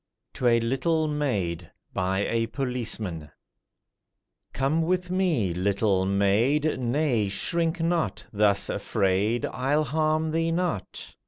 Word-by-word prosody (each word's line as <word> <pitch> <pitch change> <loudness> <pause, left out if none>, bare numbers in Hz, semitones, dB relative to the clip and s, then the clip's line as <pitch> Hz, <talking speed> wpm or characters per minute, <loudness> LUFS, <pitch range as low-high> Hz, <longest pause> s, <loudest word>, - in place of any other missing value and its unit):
TO 125 - 0
A 115 -1 +5
LITTLE 155 +7 0
MAID 100 - -2 0.2
BY 95 +1 0
A 115 0 0
POLICEMAN 115 - -3 1.2
COME 140 +5 0
with 180 +2 -1
me, 165 - +1
little 95 +1 +1
maid, 115 +11 +2
Nay, 125 -3 +1
shrink 165 - -1
not, 165 0 -1
thus 100 -1 +3
afraid— 100 +5 0
I'll 140 +4 0
harm 155 +2 0
thee 165 +1 0
not! 170 - -3
125 Hz, 110 wpm, -26 LUFS, 100-155 Hz, 1.2 s, A